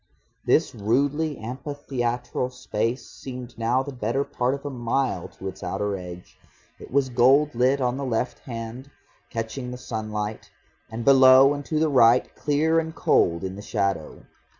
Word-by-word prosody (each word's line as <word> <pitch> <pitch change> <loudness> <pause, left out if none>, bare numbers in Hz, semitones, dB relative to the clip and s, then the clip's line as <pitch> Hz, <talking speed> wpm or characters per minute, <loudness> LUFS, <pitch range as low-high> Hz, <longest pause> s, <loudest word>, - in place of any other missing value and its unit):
This - - +3
rudely 145 +8 0
amphitheatral 125 -1 -3
space 120 0 -3
seemed 125 -2 -9
now 120 +3 +1
the 140 - -6
better 120 +3 -1
part 125 -1 -1
of 140 - -11
a 145 - -3
mile 120 -5 -1
to 95 - -6
its 95 0 -7
outer 100 +2 -2
edge. 90 -1 -10 0.4
It - - -11
was 135 0 +2
gold 135 +5 +4
lit 130 +3 +2
on 125 0 0
the 140 - -4
left 125 -1 -2
hand, 115 +2 -7 0.4
catching 120 +2 -4
the 125 - -6
sunlight, 110 -3 -5 0.4
and 115 +1 -5
below 135 0 +7
and 145 0 -5
to 155 - -2
the 160 - +3
right 125 -3 +4
clear 155 +3 +2
and 160 0 -4
cold 85 +1 +2
in 95 0 -4
the 100 - -8
shadow. 100 -6 -2
125 Hz, 160 wpm, -24 LUFS, 110-135 Hz, 0.4 s, below